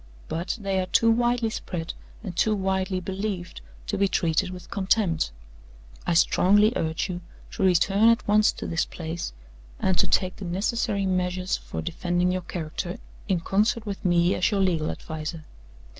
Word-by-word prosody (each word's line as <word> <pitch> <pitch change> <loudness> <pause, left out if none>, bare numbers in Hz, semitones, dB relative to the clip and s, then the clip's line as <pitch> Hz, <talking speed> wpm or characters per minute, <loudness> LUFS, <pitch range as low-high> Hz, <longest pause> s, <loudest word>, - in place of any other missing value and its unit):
But 170 +7 -2
they 195 -2 0
are 185 - -1
too 230 +5 +4
widely 240 0 +2
spread 170 -6 -4 0.3
and 185 -6 -6
too 215 +4 +2
widely 190 -1 0
believed 190 - -4 0.2
to - - -2
be 200 - +4
treated 175 0 +1
with 180 +2 -10
contempt. 190 -5 +1 0.8
I 175 - +2
strongly 205 +6 +5
urge 160 +2 -1
you 180 -2 -5 0.3
to - - -6
return 195 +4 +4
at 230 +1 +2
once 210 +1 +5
to - - -7
this 165 - 0
place, 165 0 -5 0.5
and 190 - +2
to - - +4
take 185 -1 +1
the 195 - -7
necessary 200 +3 0
measures 185 0 0
for - - -6
defending 175 +2 0
your 185 0 -1
character, 175 +2 -4 0.3
in 185 -5 +1
concert 215 +5 +1
with 205 0 -5
me, 175 -1 +3
as 180 - +2
your 200 -3 +1
legal 165 -5 +1
adviser. 155 0 -5
185 Hz, 165 wpm, -26 LUFS, 175-205 Hz, 0.8 s, strongly